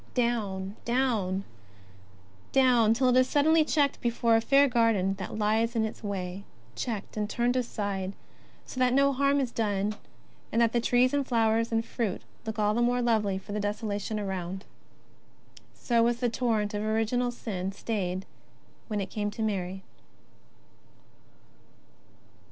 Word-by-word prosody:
Down, 210 -5 -1
down, 225 -7 0 1.1
till 250 -1 +4
it 250 - +3
is 255 0 +4
suddenly 315 +2 +4
checked 290 -2 +1
before 235 -1 +2
a 225 - +3
fair 275 +4 +5
garden 225 -6 +2
that 190 +3 -5
lies 220 +2 +1
in 220 -1 +2
its 220 - -7
way; 190 -2 -4 0.3
checked 220 -4 -4
and 210 -1 -1
turned 245 +2 0
aside, 200 -6 -2 0.5
so 255 - -7
that 255 0 +3
no 280 0 +4
harm 280 +1 +2
is 260 -3 -1
done, 210 -2 -1 0.6
and 230 - +1
the 235 +1 +2
trees 250 +2 +3
and 285 -2 0
flowers 230 -1 +2
and 225 0 +1
fruit 225 -7 -3 0.2
look 220 -1 -3
all 210 0 +2
the 235 - +1
more 245 +1 +2
lovely 215 -5 +1
for 200 +2 -9
the 210 - -2
desolation 205 +1 -2
around. 190 -1 -4 1.1
So 235 -2 +1
was 235 0 +2
the 245 -1 +1
torrent 225 -3 0
of 205 - -2
original 225 +3 0
sin 195 -6 -4
stayed 195 -3 -3 0.6
when 210 -2 -2
it 195 - -5
came 205 -1 -2
to 220 +2 -4
Mary. 190 -3 -2
225 Hz, 145 wpm, -28 LUFS, 205-245 Hz, 1.1 s, fair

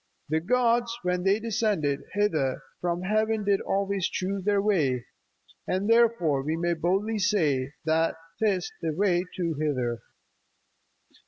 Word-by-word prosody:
The 160 +1 +2
gods, 235 +4 +1
when 180 0 0
they 195 +3 +2
descended, 205 -10 0
hither 155 -11 0 0.2
From 175 0 -2
heaven 215 +2 +1
did 200 -1 +2
always 195 -1 0
choose 190 +1 -3
their 205 0 +2
way; 150 - +1 0.6
And 190 +2 0
therefore 230 -11 +3
we 155 +4 -2
may 170 +1 +1
boldly 195 +7 0
say 150 -10 +1
That 160 +1 +2 0.2
'tis 200 -5 +1
the 160 -2 -1
way 180 0 +2
too 170 -3 -1
thither. 125 -6 -1
185 Hz, 135 wpm, -27 LUFS, 160-210 Hz, 0.6 s, therefore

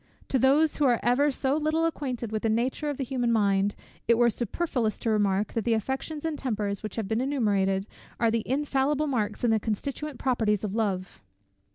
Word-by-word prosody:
To 265 - +2
those 285 +5 +4
who 295 - +2
are 245 -3 +3
ever 260 +5 +3
so 270 0 0
little 310 +2 +1
acquainted 255 -8 -3
with 215 -1 -2
the 225 - 0
nature 250 +7 0
of 290 - -3
the 275 - -2
human 245 -2 -1
mind, 200 -2 +2 0.3
it 235 - +5
were 240 0 +4
superfluous 240 - -1
to 225 - -1
remark, 205 -1 +1
that 225 - -1
the 230 +1 +2
affections 270 +7 -3
and 315 -2 -2
tempers 210 -6 -2
which 215 -2 -6
have 220 -4 -3
been 220 +4 0
enumerated, 200 -8 +1 0.3
are 230 -1 +3
the 230 0 +1
infallible 280 +2 +1
marks 225 -7 -2
and 235 -2 +3
the 220 - +3
constituent 270 +7 -4
properties 220 -6 +1
of 205 -2 -3
Love. 195 - -2
235 Hz, 200 wpm, -27 LUFS, 215-275 Hz, 0.3 s, it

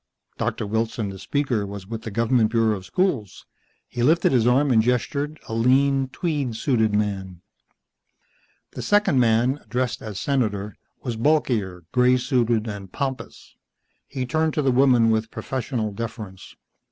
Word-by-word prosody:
Doctor - - -2
Wilson, 110 0 -2
the 95 0 -8
speaker, 135 -3 -1
was 100 -1 -7
with 115 +2 -6
the 110 - -6
government 115 +1 +2
bureau 115 -1 +2
of 95 -2 -9
schools. 140 - -1 0.4
He 120 - -5
lifted 160 +7 +3
his 120 -3 +3
arm 135 +3 +3
and 110 -2 +5
gestured, 140 +6 -1
a - - -5
lean, 135 +3 +3
tweed 140 -5 -2
suited 110 -4 +1
man. 95 -4 -2 1.3
The - - -7
second 205 -10 +3
man, 120 +4 +2
addressed 125 -1 -2
as 105 -3 -6
Senator, 105 -7 -1 0.3
was 120 -4 -3
bulkier, 115 - 0
grey 125 0 +4
suited 120 -3 +1
and 100 -3 -7
pompous. 135 +3 -5 0.5
He 130 -1 -4
turned 155 +3 0
to 150 - +1
the 135 - +3
woman 125 -3 +4
with 110 0 0
professional 120 -5 -3
deference. 105 -3 -7
120 Hz, 150 wpm, -23 LUFS, 110-135 Hz, 1.3 s, and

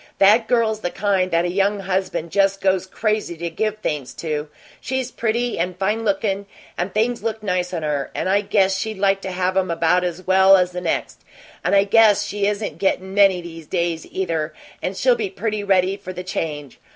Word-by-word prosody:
That 215 +3 +5
girl's 225 -3 +1
the 175 - -2
kind 195 -1 0
that 170 0 +1
a 175 - -1
young 200 +2 +1
husband 185 -3 -2
just 195 0 +2
goes 190 -1 +1
crazy 210 -4 -2
to 170 +1 -4
give 215 +5 -1
things 140 - -4
to! 150 -2 -3 0.3
She's 260 -1 -3
pretty 235 0 -1
and 180 +1 -2
fine 210 +4 0
lookin', 200 -1 -1 0.3
and 180 +2 -2
things 230 +4 0
look 220 -1 -3
nice 180 -3 -1
on 170 -3 -3
her, 145 -2 -1
and - - -2
I 200 +2 +3
guess 195 -2 +2
she'd 220 +1 -3
like 195 0 +2
to 190 - -5
have 185 0 -1
'em 190 -1 +1
about 170 +2 +2
as 180 +1 -4
well 190 +1 +6
as 180 -1 +1
the 180 0 -5
next. 170 - -2 0.4
And 195 - +2
I 195 - +6
guess 205 0 +4
she 205 -1 -1
isn't 210 +1 -3
gettin' 190 -1 0
many 195 -3 +4
these 165 -2 -10
days, 170 -3 -2
either, 165 -4 -2 0.3
and 185 +1 -3
she'll 255 -1 +4
be 220 -4 -2
pretty 210 +2 -3
ready 190 -1 +2
for 185 - -8
the 180 - -6
change. 150 -6 -5
190 Hz, 205 wpm, -21 LUFS, 180-205 Hz, 0.4 s, well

